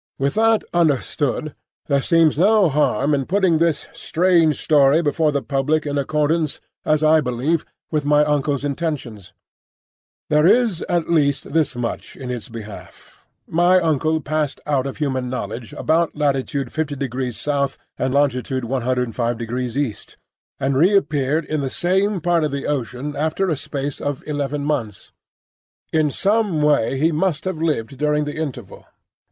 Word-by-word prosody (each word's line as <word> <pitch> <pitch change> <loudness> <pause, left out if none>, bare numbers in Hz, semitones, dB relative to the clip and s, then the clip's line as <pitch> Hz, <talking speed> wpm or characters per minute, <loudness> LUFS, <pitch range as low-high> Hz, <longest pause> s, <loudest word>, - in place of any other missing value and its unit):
With 140 +1 0
that 225 0 +3
understood, 150 -2 0 0.3
there 140 -2 +1
seems 165 +1 +3
no 205 -1 +5
harm 145 0 +1
in 135 -2 0
putting 185 -4 +2
this 165 -3 0
strange 165 -4 +2
story 145 +1 +4
before 155 +1 +1
the 140 -1 -1
public 145 +3 0
in 145 -1 -1
accordance, 150 +2 0 0.2
as 155 0 +1
I 155 0 +5
believe, 135 +5 -1 0.3
with 155 -2 0
my 150 +1 +4
uncle's 145 -1 0
intentions. 140 - -4 1.0
There 150 +2 +4
is 220 -4 +3
at 170 -1 0
least 145 -4 +1
this 155 -4 +1
much 120 -1 -4
in 130 -2 -6
its 120 -1 -6
behalf: 110 -3 -11 0.2
my 175 +3 +3
uncle 160 -1 +1
passed 150 -1 -2
out 140 -2 0
of 135 - -6
human 130 -4 -2
knowledge 115 -1 -5
about 165 +1 0
latitude 140 -2 -1
5° 140 -2 -2
S. 135 - -20 0.2
and 130 - 0
longitude 130 -2 0
105° 120 -1 -2
E., 140 -7 -3 0.4
and 135 0 0
reappeared 155 -3 +2
in 155 -1 -2
the 135 - -2
same 190 +6 0
part 170 0 +2
of 150 - +1
the 140 0 -4
ocean 140 0 -3
after 160 +5 0
a - - +1
space 140 -1 -5
of 145 -2 -3
eleven 145 -1 -2
months. 120 -10 -3 0.8
In 155 -1 +3
some 200 -1 +1
way 145 -3 +2
he 160 +5 +2
must 160 0 -1
have 185 -4 -3
lived 135 -6 -2
during 150 0 +1
the 145 +2 -5
interval. 130 -10 -6
145 Hz, 150 wpm, -21 LUFS, 135-160 Hz, 1.0 s, no